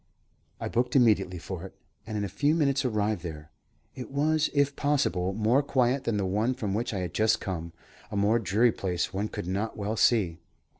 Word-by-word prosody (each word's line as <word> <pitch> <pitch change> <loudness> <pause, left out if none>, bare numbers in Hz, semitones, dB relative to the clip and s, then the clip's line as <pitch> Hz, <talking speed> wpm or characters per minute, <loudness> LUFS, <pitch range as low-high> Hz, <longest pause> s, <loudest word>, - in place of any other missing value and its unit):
I - - -3
booked 125 +2 0
immediately 105 -8 +3
for 85 +1 -6
it, 95 - -10 0.3
and 110 -1 -3
in 105 - -1
a - - -1
few 125 - +1
minutes 140 -3 +2
arrived 105 -5 0
there. 75 -3 -8 0.4
It 125 - -8
was, 150 +2 +1
if 140 -1 +1
possible, 115 -11 +1
more 110 +7 +2
quiet 130 -1 +1
than 115 -3 0
the 100 - 0
one 105 +7 0
from 105 -5 -3
which 115 +4 -1
I 100 -4 -3
had 90 -2 -4
just 110 0 +2
come; 85 -3 -4 0.4
a 105 - -4
more 105 +3 +3
dreary 110 +4 +3
place 90 -4 -2
one 100 +3 -1
could - - -6
not 100 +5 -2
well 105 +1 -2
see. 100 -8 +2
110 Hz, 200 wpm, -28 LUFS, 95-125 Hz, 0.4 s, immediately